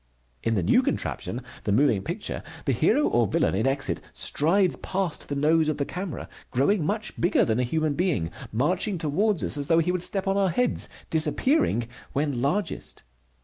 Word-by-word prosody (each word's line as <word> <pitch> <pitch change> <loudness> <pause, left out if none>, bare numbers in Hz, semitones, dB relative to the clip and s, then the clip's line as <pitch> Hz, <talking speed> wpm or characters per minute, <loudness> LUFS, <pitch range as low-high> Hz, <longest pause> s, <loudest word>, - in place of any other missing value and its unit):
In 115 - 0
the 95 - 0
new - - +4
contraption, 125 - -3 0.2
the 105 - -1
moving 110 -2 +3
picture, - - -4 0.2
the - - +2
hero - - +3
or - - +2
villain - - +1
in 110 +7 +1
exit 135 - 0
strides 180 +5 +3
past 185 -4 -3
the 145 - -2
nose 155 +2 +3
of 155 - -1
the 140 - -1
camera, 180 0 -5 0.2
growing 155 +9 +2
much 210 +7 -3
bigger 175 - +3
than 110 +1 0
a - - +2
human 155 +4 0
being, 140 - 0 0.2
marching 175 - 0
toward 175 +5 0
us - - -2
as 140 -1 -2
though 165 - +4
he 165 +2 +2
would 180 -1 -1
step 195 +2 0
on 195 +1 +1
our 195 -1 +3
heads, 245 +8 +1 0.2
disappearing 160 - +1 0.3
when 140 -3 -1
largest. 165 +7 -2
155 Hz, 185 wpm, -26 LUFS, 135-185 Hz, 0.3 s, new